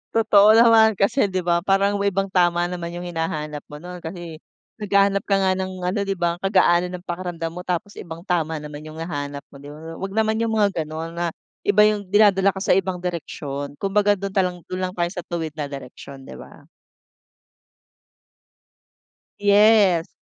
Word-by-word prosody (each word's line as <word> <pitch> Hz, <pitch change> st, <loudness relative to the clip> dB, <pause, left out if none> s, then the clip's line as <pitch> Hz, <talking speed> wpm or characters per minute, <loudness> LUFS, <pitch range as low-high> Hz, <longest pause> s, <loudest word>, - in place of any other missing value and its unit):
Totoo 215 Hz, -1 st, +6 dB
naman 225 Hz, -2 st, +6 dB
kasi 200 Hz, +4 st, +2 dB
'di 185 Hz, -2 st, -3 dB
ba 170 Hz, 0 st, +2 dB
parang 200 Hz, +1 st, +2 dB
may 200 Hz, 0 st, +2 dB
ibang 195 Hz, 0 st, -1 dB
tama 175 Hz, -2 st, +2 dB
naman 175 Hz, -1 st, -5 dB
yung 175 Hz, -, -6 dB
hinahanap 155 Hz, -3 st, -4 dB
mo 150 Hz, -, -10 dB
nun 180 Hz, 0 st, -8 dB
kasi 165 Hz, -1 st, -8 dB, 0.4 s
naghahanap 200 Hz, -1 st, +2 dB
ka 200 Hz, -, +2 dB
nga 190 Hz, -1 st, +2 dB
ng 190 Hz, 0 st, -3 dB
ano 185 Hz, +3 st, -1 dB
'di 195 Hz, -, 0 dB
ba 170 Hz, -1 st, -1 dB
kagaanan 180 Hz, -2 st, +2 dB
ng 180 Hz, +1 st, -11 dB
pakiramdam 175 Hz, -2 st, -4 dB
mo 180 Hz, +2 st, -7 dB
tapos 180 Hz, +3 st, -3 dB
ibang 165 Hz, -1 st, -8 dB
tama 165 Hz, -4 st, -1 dB
naman 150 Hz, 0 st, -9 dB
yung 155 Hz, -, -10 dB
hahanap 145 Hz, -4 st, -5 dB
mo 140 Hz, -, -13 dB
'di 140 Hz, -, -12 dB
ba. 150 Hz, -, -11 dB, 0.2 s
Wag 195 Hz, 0 st, -5 dB
naman 220 Hz, 0 st, +1 dB
yung 230 Hz, -1 st, 0 dB
mga 200 Hz, -6 st, +1 dB
ganon 160 Hz, +2 st, -6 dB
na 175 Hz, 0 st, 0 dB, 0.4 s
iba 205 Hz, +1 st, +5 dB
yung 210 Hz, -2 st, +1 dB
dinadala 200 Hz, -1 st, +4 dB
ka 190 Hz, -, -5 dB
sa -, -, +1 dB
ibang 185 Hz, -2 st, -2 dB
direksyon. 145 Hz, -5 st, -5 dB
Kung 195 Hz, +5 st, -3 dB
baga 205 Hz, 0 st, +3 dB
dun 195 Hz, 0 st, -5 dB
talang 180 Hz, -3 st, -1 dB
dun 185 Hz, -, -3 dB
lang 185 Hz, 0 st, -3 dB
tayo 175 Hz, -1 st, 0 dB
sa 180 Hz, -4 st, -7 dB
tuwid 165 Hz, -2 st, -3 dB
na 145 Hz, -2 st, -3 dB
direksyon 135 Hz, 0 st, -10 dB
'di -, -, -11 dB
ba. -, -, -14 dB, 2.7 s
Yes. 205 Hz, -4 st, +4 dB
180 Hz, 185 wpm, -22 LUFS, 165-200 Hz, 2.7 s, Totoo